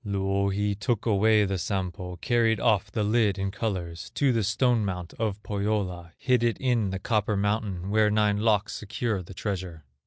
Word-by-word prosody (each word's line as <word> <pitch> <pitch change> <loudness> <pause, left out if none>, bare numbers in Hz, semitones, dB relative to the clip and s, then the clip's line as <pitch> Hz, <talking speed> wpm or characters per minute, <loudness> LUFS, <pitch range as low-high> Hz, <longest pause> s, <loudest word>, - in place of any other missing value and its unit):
Louhi 100 0 0
took 105 +2 -2
away 110 0 +4
the 95 -1 -2
Sampo, 90 -2 -3
Carried 115 +2 +1
off 105 -3 +2
the 105 - -1
lid 105 -2 +2
in 95 0 -2
colors 95 -5 -4
To 140 -3 +3
the 115 -2 +1
stone 115 +3 +2
mount 90 -3 -4
of 105 -2 -2
Pohyola; 100 -5 -2
Hid 125 -3 +2
it 120 -1 +1
in 120 -6 +1
the 95 - -3
copper 105 +1 0
mountain, 100 -2 -1
Where 110 0 +4
nine 105 -1 +2
locks 105 -2 +2
secure 105 -1 -2
the 90 +2 -11
treasure. 90 -5 -4
105 Hz, 175 wpm, -27 LUFS, 95-110 Hz, -, away